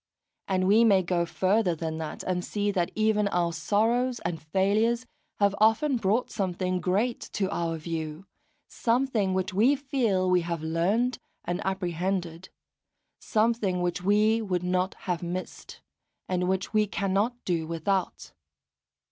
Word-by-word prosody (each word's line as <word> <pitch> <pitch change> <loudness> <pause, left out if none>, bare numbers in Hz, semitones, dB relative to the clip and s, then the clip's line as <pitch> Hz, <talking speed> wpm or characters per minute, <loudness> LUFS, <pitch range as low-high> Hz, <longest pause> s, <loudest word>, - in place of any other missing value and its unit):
And 185 -1 +1
we 210 +4 +5
may 195 -5 +5
go 175 -1 0
further 190 -1 +1
than 160 0 -4
that, 160 -1 -5
and 180 -1 -1
see 205 +1 -1
that 180 -4 0
even 215 -1 +2
our 175 -3 0
sorrows 230 +9 +1
and 170 -1 -2
failures 210 +9 +1 0.3
have 200 -1 +3
often 245 +6 +3
brought 220 +3 0
something 185 -3 -1
great 210 +7 0
to 195 -3 0
our 165 -3 -1
view, 160 +1 -5 0.4
something 230 -5 0
which 190 +1 -1
we 235 +9 +4
feel 245 -9 0
we 180 -1 +3
have 170 -2 -4
learned 195 +10 0 0.3
and 175 +1 -2
apprehended, 180 -1 -2 0.7
something 215 -4 +1
which 175 0 -1
we 210 +4 +3
would 180 -4 -2
not 180 +1 0
have 180 -3 -1
missed, 180 +1 -6 0.5
and 180 0 0
which 190 +2 -1
we 215 -1 +3
cannot 200 +5 0
do 165 -3 -1
without. 175 +3 -2
190 Hz, 140 wpm, -27 LUFS, 175-215 Hz, 0.7 s, we